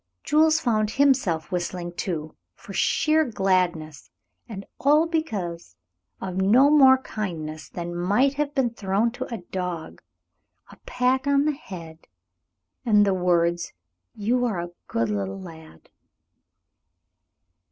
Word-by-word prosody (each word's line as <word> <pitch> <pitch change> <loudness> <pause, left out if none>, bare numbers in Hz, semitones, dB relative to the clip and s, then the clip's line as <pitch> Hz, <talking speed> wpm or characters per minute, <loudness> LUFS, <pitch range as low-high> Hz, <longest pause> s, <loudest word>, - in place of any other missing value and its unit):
Jules 315 +1 +3
found 215 -5 +1
himself 220 - +1
whistling, 175 0 -3
too, 160 -4 -4 0.2
for 200 - -12
sheer 315 - +2
gladness, 180 - -1 0.4
and 200 -3 -7
all 300 +3 +4
because 200 - -4 0.4
of 185 -1 -5
no 235 +10 +5
more 265 -3 +7
kindness 155 -7 -5
than 175 0 -6
might 205 +11 +2
have 290 0 -3
been 260 -4 +1
thrown 210 +1 0
to 245 - -7
a 225 -6 -5
dog; 180 -3 -5 0.7
a - - -15
pat 255 +2 0
on 280 0 +3
the 305 - +2
head 170 - -10 0.8
and 210 -4 +4
the 195 - +2
words, 175 -2 +1 0.4
"You 240 +4 0
are 210 -7 -1
a 175 0 -5 0.2
good 115 -1 -1
little 95 -2 -3
lad." 160 - -13
195 Hz, 125 wpm, -24 LUFS, 170-260 Hz, 0.8 s, more